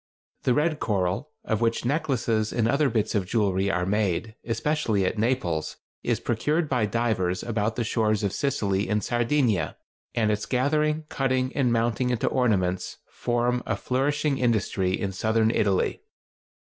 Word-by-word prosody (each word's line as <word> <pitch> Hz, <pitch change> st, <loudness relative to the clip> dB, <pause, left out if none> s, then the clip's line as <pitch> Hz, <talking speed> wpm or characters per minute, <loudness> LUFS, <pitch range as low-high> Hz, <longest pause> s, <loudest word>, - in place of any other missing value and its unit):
The 125 Hz, -, +3 dB
red 155 Hz, +1 st, +1 dB
coral 95 Hz, +5 st, -1 dB, 0.2 s
of 110 Hz, 0 st, -1 dB
which 115 Hz, 0 st, +1 dB
necklaces 125 Hz, -7 st, 0 dB
and 115 Hz, -2 st, +1 dB
other 140 Hz, +3 st, +2 dB
bits 110 Hz, -3 st, 0 dB
of 100 Hz, -4 st, 0 dB
jewelry 100 Hz, -3 st, +1 dB
are 90 Hz, -2 st, 0 dB
made, 105 Hz, +1 st, 0 dB
especially 115 Hz, -3 st, 0 dB
at 105 Hz, -, -1 dB
Naples, 110 Hz, -, -1 dB, 0.2 s
is -, -, 0 dB
procured 150 Hz, +8 st, 0 dB
by 125 Hz, -6 st, +1 dB
divers 105 Hz, -5 st, 0 dB
about 110 Hz, -1 st, -1 dB
the 120 Hz, -, -1 dB
shores 110 Hz, -2 st, +1 dB
of 100 Hz, -, 0 dB
Sicily 105 Hz, -8 st, 0 dB
and 105 Hz, -1 st, +1 dB
Sardinia, 120 Hz, -, +1 dB, 0.4 s
and 110 Hz, -2 st, +2 dB
its 105 Hz, 0 st, -2 dB
gathering, 150 Hz, +5 st, +1 dB
cutting 130 Hz, -1 st, 0 dB
and 130 Hz, -4 st, +2 dB
mounting 120 Hz, +2 st, +1 dB
into 125 Hz, -3 st, 0 dB
ornaments, 95 Hz, -8 st, 0 dB
form 120 Hz, +1 st, 0 dB
a -, -, +1 dB
flourishing 140 Hz, +2 st, 0 dB
industry 100 Hz, -6 st, +1 dB
in 100 Hz, -2 st, -2 dB
southern 110 Hz, +3 st, +1 dB
Italy. 100 Hz, -5 st, +1 dB
115 Hz, 150 wpm, -26 LUFS, 105-130 Hz, 0.4 s, The